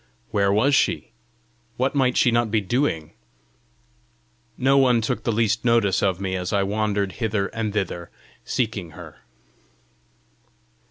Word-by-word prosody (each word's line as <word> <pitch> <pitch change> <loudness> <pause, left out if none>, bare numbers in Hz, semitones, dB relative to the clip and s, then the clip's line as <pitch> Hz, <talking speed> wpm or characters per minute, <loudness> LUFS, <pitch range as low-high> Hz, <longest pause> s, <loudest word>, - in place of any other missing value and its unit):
Where 100 -2 +2
was 120 +8 +3
she? 135 - +1 0.7
What 130 +2 0
might 130 -3 +1
she 120 - +4
not 120 -1 +1
be 110 +1 +2
doing? 100 - -1 1.4
No 135 +2 +3
one 130 -3 +4
took 110 - -3
the 115 - +1
least 115 0 +1
notice 115 -6 +2
of 95 -2 +1
me 95 -1 -2
as 90 -1 -3
I 100 -1 +2
wandered 100 -1 -1
hither 105 -3 0
and 115 -2 -3
thither 95 -4 -3 0.3
seeking 105 -9 -3
her. - - -11
110 Hz, 140 wpm, -23 LUFS, 100-120 Hz, 1.4 s, she